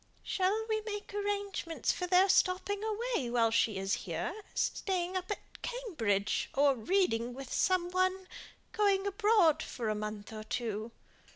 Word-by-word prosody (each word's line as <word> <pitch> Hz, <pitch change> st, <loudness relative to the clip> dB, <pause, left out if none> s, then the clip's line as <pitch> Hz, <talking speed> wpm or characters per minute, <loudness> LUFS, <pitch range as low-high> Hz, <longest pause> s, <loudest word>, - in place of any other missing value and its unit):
"Shall 400 Hz, +4 st, 0 dB
we 435 Hz, -1 st, 0 dB
make 415 Hz, -1 st, -6 dB
arrangements 405 Hz, -4 st, -1 dB
for 360 Hz, -, -3 dB
their 365 Hz, +2 st, +5 dB
stopping 385 Hz, +2 st, +2 dB
away 440 Hz, -, -1 dB
while 230 Hz, -2 st, +3 dB
she 225 Hz, -2 st, +2 dB
is 195 Hz, +1 st, -1 dB
here; -, -, -2 dB, 0.2 s
staying 370 Hz, -1 st, -1 dB
up 370 Hz, 0 st, -3 dB
at 415 Hz, -, -7 dB
Cambridge, 310 Hz, -, -1 dB
or 280 Hz, 0 st, +5 dB
reading 245 Hz, -, +1 dB
with 270 Hz, -1 st, -7 dB
some 360 Hz, -1 st, +2 dB
one? 370 Hz, +1 st, +1 dB, 0.4 s
going 405 Hz, -3 st, +2 dB
abroad 400 Hz, -6 st, +4 dB
for 230 Hz, -3 st, -4 dB
a -, -, +2 dB
month 210 Hz, 0 st, -5 dB
or 215 Hz, 0 st, -6 dB
two?" 220 Hz, -1 st, -3 dB
365 Hz, 150 wpm, -32 LUFS, -, 0.4 s, their